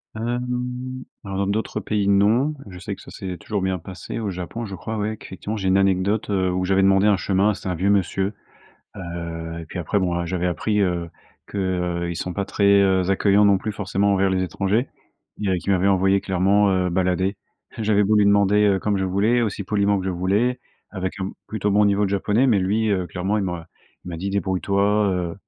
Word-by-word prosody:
Hem, 125 +2 -3 0.2
alors 95 -1 -5
dans 100 0 0
d'autres 105 +3 -2
pays, 105 -2 -1
non, 110 +9 +3 0.2
je 90 - -10
sais 100 +2 -5
que - - -15
ça - - -13
s'est 95 -2 -6
toujours 105 +1 -3
bien 95 -1 -1
passé. 95 +6 -7
Au 110 -3 -2
Japon 95 +6 -5
je 100 -2 -6
crois, 110 +3 -5
ouais, 105 +1 -2
qu'effectivement, 105 +1 -7
j'ai 95 -3 -1
une 95 - +4
anecdote, 95 +3 +1
heu, 95 -2 +1
où 90 0 -1
j'avais 95 +1 +2
demandé 95 +1 +4
un 105 - +5
chemin, 95 +3 +1
c'était 95 - -6
un 90 - -1
vieux 95 +4 0
monsieur, 95 0 +1 0.6
heu 85 -1 -6
et - - -8
puis 90 - -7
après, 90 +4 0
bon, 90 -2 0
heu, 85 - -3
j'avais 90 0 -1
appris, 105 +5 0
heu, 90 -3 0 0.4
que, 100 - -6
heu, 90 -2 -1
ils 85 - -4
sont 90 - -4
pas 100 +2 -2
très, 100 +1 -1 0.2
heu, 95 -1 +2
accueillants 100 +1 +4
non 100 -1 +5
plus 110 - -4
forcément 100 -1 0
envers 95 0 +2
les 95 -1 0
étrangers. 100 - 0 0.5
Dirais 95 -3 0
qu'il 100 - -1
m'avait 95 0 +2
envoyé 95 0 +3
clairement, 100 +2 +2
heu, 90 -1 +1
balader. 95 +2 0 0.4
J'avais 105 -2 +2
beau 105 +2 +3
lui 105 - +5
demander, 100 +1 +4
heu, 100 -2 +3
comme 105 -1 0
je 95 - 0
voulais, 100 +6 +2
aussi 105 -3 -1
poliment 100 0 +1
que - - -6
je 95 - -1
voulais, 100 +8 0 0.3
avec 95 0 -3
un 95 +1 -2 0.2
plutôt 105 -1 -2
bon 105 +1 +4
niveau 100 0 +2
de 95 - -1
japonais, 105 +6 +2
mais 110 -5 +4
lui, 105 +4 +1
heu, 95 -3 0
clairement 95 +5 -2
il 100 - -1
m'a 90 -3 -5 0.4
il - - -8
m'a 85 - -5
dit: 95 +4 -3
«Débrouille-toi», 100 0 0 0.3
heu, 90 -2 -2
95 Hz, 220 wpm, -22 LUFS, 95-105 Hz, 0.6 s, un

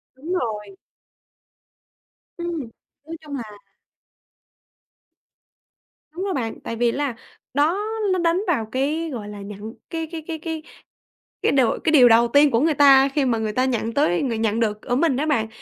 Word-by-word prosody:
Đúng 310 +7 -5
rồi! 210 - -3 1.6
Ừm, 345 -1 -3 0.5
nói 325 +1 -7
chung 295 -2 -7
là 245 - -4 2.7
Đúng 350 +4 -5
rồi 395 -1 -1
bạn, 230 -8 -3
tại 230 - -4
vì 235 +1 +2
nó - - -5
là 285 -4 -1 0.4
đó 305 +7 +2 0.3
nó 370 - 0
đánh 340 +2 +2
vào 285 -11 +1
cái, 300 +5 -1
gọi 215 -4 -6
là, 205 -1 -8
nhận 200 0 -8 0.3
cái 325 -1 -4
cái 330 -2 -5
cái 325 - -4
cái 320 0 -5 0.8
cái - - +2
đầu 260 -4 +2
cái 320 - +2
điều 265 -6 +7
đầu 235 +1 +5
tiên 285 +4 +5
của 230 - +3
người 315 +4 +2
ta 275 -1 +6
khi 275 0 0
mà 240 -3 +1
người 220 -1 -2
ta 255 +3 +1
nhận 230 -3 -1
tới 200 -11 +2
người 240 -5 -1
nhận 220 0 0
được 215 -2 -1
ở 245 - -2
mình 275 -1 +2
á 295 - 0
bạn. 270 -8 +1
270 Hz, 180 wpm, -22 LUFS, 230-320 Hz, 2.7 s, điều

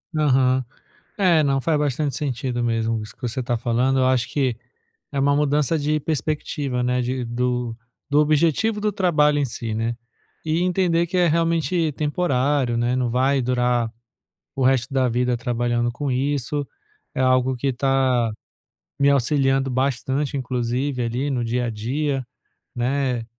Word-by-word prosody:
Aham, 130 -3 +3 0.5
é, 175 -6 +4
não. 135 -2 +1
Faz 160 +1 +1
bastante 145 0 -1
sentido 130 -3 -2
mesmo 115 -1 0
isso 105 +1 -9
que - - -35
você 125 +2 -2
tá 120 -1 -1
falando, 125 +3 +1
eu 130 - +3
acho 130 -2 +2
que 130 -5 0 0.5
é 140 - -2
uma 140 +1 +3
mudança 150 +2 +1
de 150 +1 0
perspectiva, 145 -3 -2
né? 125 0 +1
De 125 +1 -2
do 125 0 -2 0.3
do 145 +1 +3
objetivo 165 +8 +2
do 210 0 +1
trabalho 150 -7 +2
em 145 - +1
si, 115 -2 -5
né, 115 +2 -1 0.5
e 160 +2 +1
entender 175 -2 +1
que 180 - -5
é 175 -1 +4
realmente 165 0 +1
temporário, 140 -4 0
né, 120 +1 +1
não 125 -1 0
vai 130 +3 +2
durar 125 -1 +1 0.7
o 135 - -2
resto 130 +1 +2
da 130 -2 +2
vida 125 0 0
trabalhando 120 0 0
com 135 +3 -3
isso, 140 +2 -1 0.5
é - - -2
algo 130 0 +2
que 135 +2 -1
tá 130 -2 +1 0.7
me 140 0 +4
auxiliando 135 0 +2
bastante 135 +2 -1
inclusive 125 +1 -2
ali 125 +5 -2
no 125 -3 -1
dia 120 +1 -1
a - - -1
dia, 130 +5 -2 0.5
né? 125 -1 -1
130 Hz, 155 wpm, -22 LUFS, 125-145 Hz, 0.7 s, é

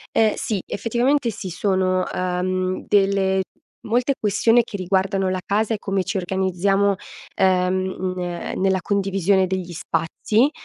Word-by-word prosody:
Eh, 220 -1 +4
sì. 210 -4 -2
Effettivamente, 240 +4 0
sì. 195 -2 -6
Sono, 185 0 +1
uhm, 185 +1 -1
delle 195 -1 +2 0.4
molte 245 +5 +1
questioni 225 +3 +3
che 215 - -6
riguardano 190 0 0
la 185 0 -1
casa 215 +2 0
e 215 - -1
come 195 -1 -1
ci 190 +3 -3
organizziamo, 190 +2 +1 0.4
ehm 185 0 +1
ehm, 175 -1 -4
nella 190 -1 +2
condivisione 195 -1 +1
degli 185 -1 -3
spazi, 175 - 0
190 Hz, 130 wpm, -22 LUFS, 185-205 Hz, 0.4 s, Eh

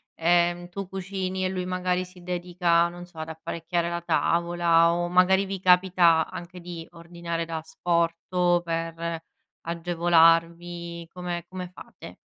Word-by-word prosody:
ehm, 175 +1 +2
tu 195 +1 -6
cucini 190 0 -4
e 185 - +1
lui 185 -1 -3
magari 185 0 -1
si 180 -1 -16
dedica, 175 -1 +1
non 175 +1 -9
so, 175 -2 -21
ad 160 0 -5
apparecchiare 170 +2 -3
la 170 0 -2
tavola 170 -1 +2
o 175 0 -1
magari 185 +2 +4
vi 195 -1 -4
capita 180 -3 +4
anche 175 +1 -8
di 170 -2 -8
ordinare 170 0 -5
da 165 -1 -4
asporto 170 +2 0
per 165 0 -3 0.5
agevolarvi, 170 0 +2
come 175 -2 -4
come 185 -1 -6
fate? 180 - -13
175 Hz, 135 wpm, -26 LUFS, 170-180 Hz, 0.5 s, magari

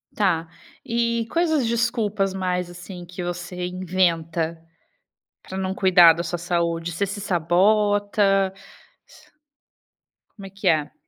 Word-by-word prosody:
Tá, 170 -5 +1 0.4
e 235 -1 0
quais 335 -1 +1
as 290 -6 +2
desculpas 225 -4 0
mais, 180 -1 -2
assim, 180 0 -10
que 180 +1 -7
você 180 0 -5
inventa 170 -3 -1 0.8
para 190 - -7
não 190 0 -2
cuidar 175 -4 +6
da 170 - -3
sua 175 0 -4
saúde? 170 -1 -1
Você 200 - -1
se 200 +1 -5
sabota? 200 +2 +2 1.8
Como 200 -3 -13
é - - -11
que 195 0 -5
é? 155 -3 +2
185 Hz, 125 wpm, -23 LUFS, 175-205 Hz, 1.8 s, cuidar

